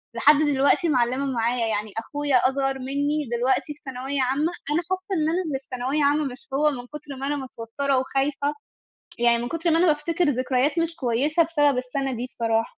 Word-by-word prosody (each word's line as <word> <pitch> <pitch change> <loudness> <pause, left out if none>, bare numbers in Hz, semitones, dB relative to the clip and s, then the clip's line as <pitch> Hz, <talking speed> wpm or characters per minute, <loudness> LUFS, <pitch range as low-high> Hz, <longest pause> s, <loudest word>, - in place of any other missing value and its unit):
لحد 300 - +6
دلوقتي 290 +3 +3
معلِّمة 255 +1 +1
معايا. 235 -2 0
يعني 210 -1 -2
أخويا 285 +4 -1
أصغر 270 0 -1
منِّي 285 +1 -1
دلوقتي 265 +4 +1
في 295 - -26
ثانوية 265 +1 -3
عامة، 280 +6 +1 0.2
أنا 330 +4 +2
حاسة 375 +1 -2
إن 310 - +2
أنا 360 +3 0
اللي 270 -3 -2
في 270 - -29
ثانوية 260 +4 0
عامة، 290 +1 +3
مش 260 0 -7
هو، 300 +2 +3
من 245 -2 -7
كُتر 295 -1 -9
ما 275 - -2
أنا 290 - 0
متوترة 265 +1 -2
وخايفة. 280 +2 -1 0.7
يعني 235 0 +4
من 240 - -3
كُتر 330 0 -1
ما 325 - +4
أنا 360 - +4
بافتكر 325 +3 +1
ذكريات 260 +3 +1
مش 330 0 0
كويِسة 275 +6 +2
بسبب 290 -5 +2
السنة 265 +1 -2
دي 245 +2 -3
بصراحة. 225 -1 0
275 Hz, 190 wpm, -24 LUFS, 255-300 Hz, 0.7 s, لحد